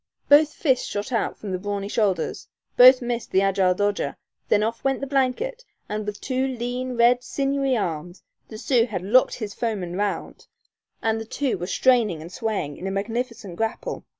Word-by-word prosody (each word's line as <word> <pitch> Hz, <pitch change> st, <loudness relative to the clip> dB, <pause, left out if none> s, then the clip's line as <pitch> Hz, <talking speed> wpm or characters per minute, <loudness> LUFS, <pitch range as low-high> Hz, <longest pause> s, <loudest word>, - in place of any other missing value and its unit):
Both 295 Hz, +1 st, +6 dB
fists 260 Hz, -5 st, +1 dB
shot 205 Hz, +5 st, -4 dB
out 230 Hz, -, -1 dB
from 205 Hz, -, -6 dB
the 185 Hz, -, -2 dB
brawny 200 Hz, 0 st, -3 dB
shoulders; 205 Hz, -3 st, -1 dB, 0.3 s
both 255 Hz, +1 st, +8 dB
missed 240 Hz, -1 st, -3 dB
the 190 Hz, -, +3 dB
agile 190 Hz, -2 st, +2 dB
dodger; 205 Hz, +1 st, -1 dB, 0.3 s
then 210 Hz, 0 st, +3 dB
off 230 Hz, +1 st, -3 dB
went 270 Hz, 0 st, +1 dB
the 275 Hz, -, -3 dB
blanket, 280 Hz, -, -1 dB, 0.2 s
and 210 Hz, 0 st, -4 dB
with 210 Hz, -1 st, -4 dB
two 260 Hz, 0 st, -1 dB
lean, 250 Hz, 0 st, -4 dB
red, 240 Hz, +1 st, +4 dB
sinewy 275 Hz, -2 st, 0 dB
arms 175 Hz, -2 st, -4 dB, 0.2 s
the 220 Hz, -, -9 dB
Sioux 240 Hz, 0 st, +2 dB
had 185 Hz, -6 st, -4 dB
"locked 245 Hz, +7 st, +4 dB
his 215 Hz, -4 st, -5 dB
foeman 195 Hz, -7 st, -3 dB
round," 205 Hz, +1 st, -3 dB, 0.6 s
and 225 Hz, 0 st, +1 dB
the -, -, -6 dB
two 265 Hz, +3 st, -1 dB
were 175 Hz, -1 st, -5 dB
straining 220 Hz, -4 st, +2 dB
and 165 Hz, +3 st, -9 dB
swaying 195 Hz, -10 st, -3 dB
in 190 Hz, -, -5 dB
a -, -, -2 dB
magnificent 225 Hz, -1 st, -4 dB
grapple. 225 Hz, 0 st, -3 dB
225 Hz, 180 wpm, -24 LUFS, 200-255 Hz, 0.6 s, both